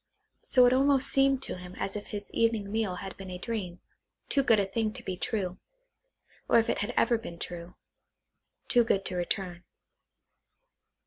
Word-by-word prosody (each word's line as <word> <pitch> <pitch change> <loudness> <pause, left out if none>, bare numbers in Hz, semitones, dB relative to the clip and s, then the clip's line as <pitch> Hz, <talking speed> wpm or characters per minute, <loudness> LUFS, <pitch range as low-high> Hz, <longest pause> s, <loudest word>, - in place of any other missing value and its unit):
So 250 -1 +5
it 245 - +5
almost 275 0 +3
seemed 270 -1 +3
to - - -5
him 180 0 -10
as 195 - -3
if 205 - -5
his 205 -1 -6
evening 225 -3 +1
meal 215 -4 0
had 190 +1 -7
been 195 -1 -8
a 180 - -5
dream, 185 -4 -4 0.5
too 280 - +3
good 230 -4 +4
a 200 - +2
thing 215 +3 -1
to 245 0 -9
be 185 - -3
true, 185 -1 -2 0.9
or - - +6
if 230 - +3
it - - -2
had 205 +4 -1
ever 235 -2 +3
been 175 -7 -8
true, 170 0 -7 0.9
too 240 -1 +5
good 195 -4 +1
to 185 - -2
return. 180 0 -2
205 Hz, 180 wpm, -29 LUFS, 185-235 Hz, 0.9 s, or